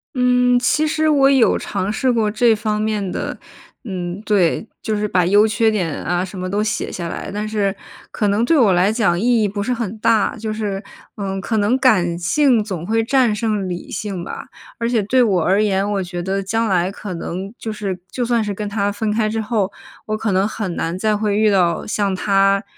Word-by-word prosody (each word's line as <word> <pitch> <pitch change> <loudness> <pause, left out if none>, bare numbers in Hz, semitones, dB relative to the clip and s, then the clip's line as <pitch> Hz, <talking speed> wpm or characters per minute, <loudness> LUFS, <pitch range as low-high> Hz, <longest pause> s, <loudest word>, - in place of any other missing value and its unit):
嗯， 250 -1 +3
其 300 +5 +2
实 315 0 +1
我 275 -3 +4
有 260 -4 +4
尝 195 +3 -3
试 255 +3 +1
过 220 -3 +1
这 225 +2 +3
方 210 0 -2
面 210 -3 -1
的 - - -4 0.5
嗯， 180 -1 -5
对， 205 +1 +1 0.2
就 220 - -1
是 210 0 -1
把 180 -3 +2
优 205 +4 +5
缺 220 +1 +2
点 180 -7 -1
啊 175 +1 0
什 190 +1 -8
么 185 0 -3
都 205 +2 0
写 215 - -2
下 170 -2 -4
来， - - -6
但 210 +1 -3
是 200 -3 0 0.4
可 210 - -1
能 205 +3 +2
对 325 - +3
我 210 -7 +5
来 185 +4 +3
讲 215 -7 +1
意 235 +1 +2
义 210 - +2
不 205 +1 -3
是 250 +4 -1
很 225 -3 -4
大， 220 0 +2
就 220 0 -4
是， 205 -2 -3 0.3
呃， 195 -1 -3
可 220 +2 -1
能 210 +4 +2
感 180 -10 +3
性 245 +6 +3
总 185 -5 -5
会 225 +2 +1
战 250 -2 +2
胜 210 -3 -1
理 175 0 -6
性 195 -1 -4
吧。 - - -7 0.3
而 230 - 0
且 235 -3 +2
对 250 +5 +3
我 185 -7 +2
而 195 +3 +3
言， 200 -1 +1
我 195 - -1
觉 175 -1 -5
得 195 +2 -2
将 225 +3 0
来 185 -1 +1
可 205 -1 -7
能 185 +4 -5
就 225 - -5
是 195 -3 -4
就 250 - -2
算 235 -2 +1
是 205 - -3
跟 205 +1 -4
他 205 -1 0
分 210 +1 -2
开 215 0 +1
之 220 0 -2
后， 210 -3 -1 0.4
我 215 - -1
可 215 -2 -1
能 190 +1 +2
很 200 -6 -4
难 165 +1 -2
再 215 0 +1
会 210 -1 0
遇 215 0 +4
到 180 -3 +1
像 205 -2 0
他 195 +1 +2
210 Hz, 235 characters per minute, -19 LUFS, 190-225 Hz, 0.5 s, 优